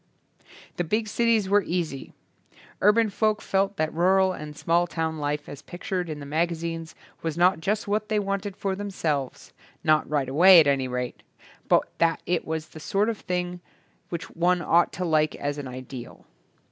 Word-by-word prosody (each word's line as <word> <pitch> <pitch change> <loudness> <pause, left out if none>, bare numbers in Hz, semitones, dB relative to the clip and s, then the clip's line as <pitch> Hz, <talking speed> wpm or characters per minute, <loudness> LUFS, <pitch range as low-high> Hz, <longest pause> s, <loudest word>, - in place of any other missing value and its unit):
The 175 - +1
big 215 +6 -1
cities 225 -2 +2
were 205 +1 +4
easy. 170 -7 -3 0.7
Urban 210 +1 +4
folk 215 +1 +1
felt 195 +1 0
that 155 0 -1
rural 185 +3 +3
and 150 -3 -8
small 170 +1 +2
town 160 -2 -3
life 145 0 -2
as 145 - -9
pictured 180 0 -4
in 150 -1 -5
the 140 - -8
magazines 165 +1 -2 0.3
was 165 -1 -3
not 180 0 +4
just 205 +5 -1
what 210 +1 -1
they 215 - +1
wanted 200 -1 -2
for 195 -1 -2
themselves 165 -9 -3
— - - -31
not 155 -1 +3
right 145 -3 0
away 175 +7 +8
at 160 - +6
any 135 -2 +1
rate 125 0 -4 0.3
— - - -26
^but - - +6 0.2
that 165 -1 +2
it 175 -1 0
was 160 -1 -4
the 155 - -11
sort 200 +7 0
of 225 - -3
thing 180 0 -3 0.5
which 170 -1 -5
one 175 +1 +1
ought 170 +1 +3
to 185 - -3
like 155 -2 +2
as 145 +1 -3
an 140 - -5
ideal. 130 -1 -9
170 Hz, 185 wpm, -25 LUFS, 155-195 Hz, 0.7 s, away